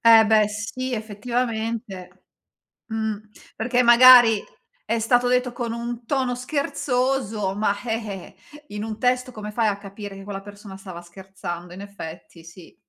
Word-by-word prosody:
Eh 225 -1 +8
beh 215 -1 +4
sì, 210 +5 -4
effettivamente, 220 -4 -4 0.6
mhmm, 220 -1 -3 0.3
perché 245 +2 +1
magari 240 -2 +8 0.4
è 230 - 0
stato 245 +2 +3
detto 250 0 +1
con 235 -2 -3
un 235 0 -5
tono 260 -2 0
scherzoso, 250 -6 -1
ma, 205 -1 +1
eh, 215 -5 -5 0.2
eh, 295 - -14
in 210 +1 -5
un 220 -1 -5
testo 250 0 +1
come 210 -2 -7
fai 225 0 +1
a 200 -1 0
capire 200 0 -9
che 195 - -10
quella 195 -1 -6
persona 200 -1 -11
stava 185 -3 -9
scherzando? 175 -1 -8
In 190 - -9
effetti, 175 -4 -10
sì. 165 +1 -14
220 Hz, 150 wpm, -23 LUFS, 200-245 Hz, 0.6 s, Eh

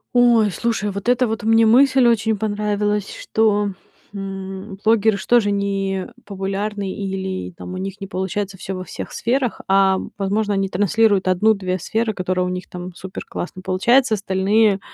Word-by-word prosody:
Ой, 235 -4 +5
слушай, 210 +2 -1
вот 200 +4 -3
эта 250 +1 +3
вот 220 0 -3
мне 225 +1 +4
мысль 260 +3 +5
очень 225 -2 +2
понравилась, 210 -1 -1
что, 210 -2 +1 0.4
м, 195 0 -6
блогеры 220 -1 +4
ж - - -8
тоже 235 -4 +4
не 195 -1 -1 0.2
популярны 200 0 -3
или 190 -1 -4
там 180 - -9
у - - -5
них 195 +1 -5
не 195 - -5
получается 195 +1 -3
всё 190 +1 -5
во 185 - -5
всех - - -7
сферах, 245 -2 -1
а 195 0 +4 0.2
возможно, 205 +2 0
они 195 -1 0
транслируют 205 +1 +2
1-2 185 0 +2
сферы, 220 +5 -1
которые 185 -1 -1
у - - -2
них 180 0 -5
там 180 0 -7
супер-классно 185 0 -7
получаются, 235 +7 +3
остальные 200 +1 +2
200 Hz, 155 wpm, -20 LUFS, 190-220 Hz, 0.4 s, Ой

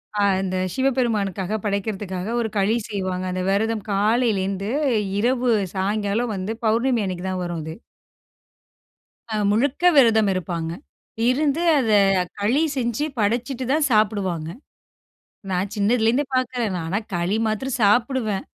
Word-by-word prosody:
அ - - -1 0.2
அந்த 185 -1 -2 0.2
சிவபெருமானுக்காக 220 -7 0
படைக்கிறதுக்காக 200 0 -3
1 225 - -2
களி 200 +3 +2
செய்வாங்க. 185 -3 -3
அந்த 185 0 -2
வெரதம் 215 +2 0
காலையிலேந்து 200 -2 +1 0.5
இரவு 245 +2 +1 0.2
சாய்ங்காலம் 205 +4 -1
வந்து 190 +3 -3
பௌர்ணமி 230 +1 +2
அன்னைக்கு 185 -1 -4
தான் 185 -1 -3
வரும் 175 -2 -4
அது. 160 +1 -6 1.6
அ - - 0 0.2
முழுக்க 265 +10 +1
விரதம் 225 -6 +5
இருப்பாங்க. 170 -2 -3 0.6
இருந்து 290 +4 +1 0.2
அத 250 -5 +1 0.5
களி 230 +9 +2
செஞ்சி 240 +2 -1
படச்சிட்டு 240 +5 -1
தான் 300 -1 +2
சாப்பிடுவாங்க. 200 -7 +1 1.0
நான் 185 +2 -1
சின்னதில 220 +2 +2
இருந்தே 255 +6 +2
பாக்குறேன் 250 -4 0
நான். 165 -2 -4
ஆனா, 195 +4 0 0.2
களி 175 +4 0
மாத்திரம் 240 +5 -2
சாப்பிடுவேன். 220 -1 +2
215 Hz, 125 wpm, -22 LUFS, 190-240 Hz, 1.6 s, விரதம்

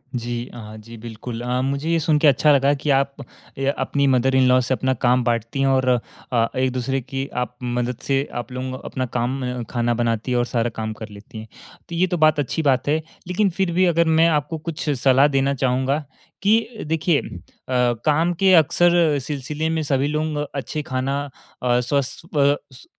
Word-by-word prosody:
जी 120 0 -3
अ, 110 -2 -9
जी 115 +2 -12
बिल्कुल 115 +1 -7
अ, 125 +1 -1
मुझे 140 +4 -2
ये 165 0 +2
सुनके 155 -1 +3
अच्छा 145 +2 +5
लगा 140 +1 +3
कि 145 +1 -4
आप 140 0 -1 0.4
अ 135 0 -1
अपनी 140 -1 0
मदर 130 0 +2
इन 130 -1 +4
लॉ 125 0 +5
से 125 +1 -1
अपना 130 0 0
काम 125 0 +2
बाँटती 115 +2 -1
है 135 - +3
और 130 -1 +2 0.4
अ, 115 -2 +2
एक-दूसरे 130 +1 0
की 135 +2 -5 0.2
आप 125 0 -10
मदद 125 0 -2
से 135 0 +2 0.2
आप 120 - -15
लोग 130 +1 -5
अपना 130 - -3
काम 125 0 -2
खाना 120 -1 0
बनाती 115 0 -1
हैं 125 - +2
और 120 - +2
सारा 120 -1 -1
काम 110 -1 -3
कर 110 0 -9
लेती 105 +4 -12
हैं। 110 0 -8 0.4
तो 170 - -5
ये 180 +2 +2
तो 180 - -2
बात 155 -1 +4
अच्छी 145 +3 -1
बात 135 -4 +1
है, 150 +2 +3 0.3
लेकिन 195 +3 +1
फ़िर 190 0 -1
भी 185 +2 +3
अगर 170 -1 +3
मैं 165 - +6
आपको 155 +1 -1
कुछ 155 0 -5
सलाह 135 0 +4
देना 135 -1 +1
चाहूँगा 130 +2 0 0.4
कि 225 +2 +1
देखिए 160 -1 +1
अ, - - -5 0.5
काम 130 +7 +1
के 190 -1 +5
अक्सर 170 -1 +4
सिलसिले 150 +3 -3
में 160 0 0
सभी 140 -1 +1
लोग 150 0 -1
अच्छे 145 +2 -3
खाना 135 +1 -2 0.4
अ, 125 -1 +2
स्वस्थ 140 +5 -2
अ, - - -19
स्वस 140 -2 0
135 Hz, 195 wpm, -22 LUFS, 125-150 Hz, 0.5 s, मैं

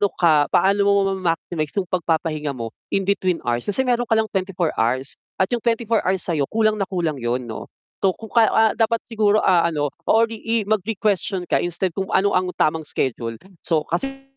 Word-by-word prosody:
ka 155 -4 +4
paano 200 +1 +2
mo - - +5 0.2
mama-maximize 165 -3 -2
'yung 185 -3 -2
pagpapahinga 160 -5 -1
mo 115 -2 -5 0.2
in 195 - 0
between 185 -3 0
hours, 120 +4 -1
kasi 235 +6 +1
meron 245 -2 0
ka 225 - +2
lang 220 -1 0
24 185 -3 -1
hours 130 +4 0 0.2
at 190 - 0
'yung 240 - +1
24 230 -1 +1
hours 190 -1 +1
sa'yo 155 -6 -1
kulang 215 -1 +1
na 195 - -1
kulang 165 -7 -2
'yun 120 +1 -1
'no. 115 -2 -7 0.3
So 190 -2 +1
kung 220 -2 -11
ka 230 -2 +5
ah, 220 -1 +4
dapat 225 0 +1
siguro, 215 -2 +1
ah, 175 -2 +4
ano 145 -3 -1 0.2
or 225 +1 +5
i 220 - -6
i 230 0 -2
mag-requestion 200 -2 -1
ka - - +4
instead 175 +1 -1
kung 190 - -2
ano 200 +1 +3
ang 185 0 +1
tamang 155 0 0
schedule, 115 -3 -2 0.2
so 155 -3 0
kasi 270 +9 -2
185 Hz, 195 wpm, -21 LUFS, 155-215 Hz, 0.3 s, mo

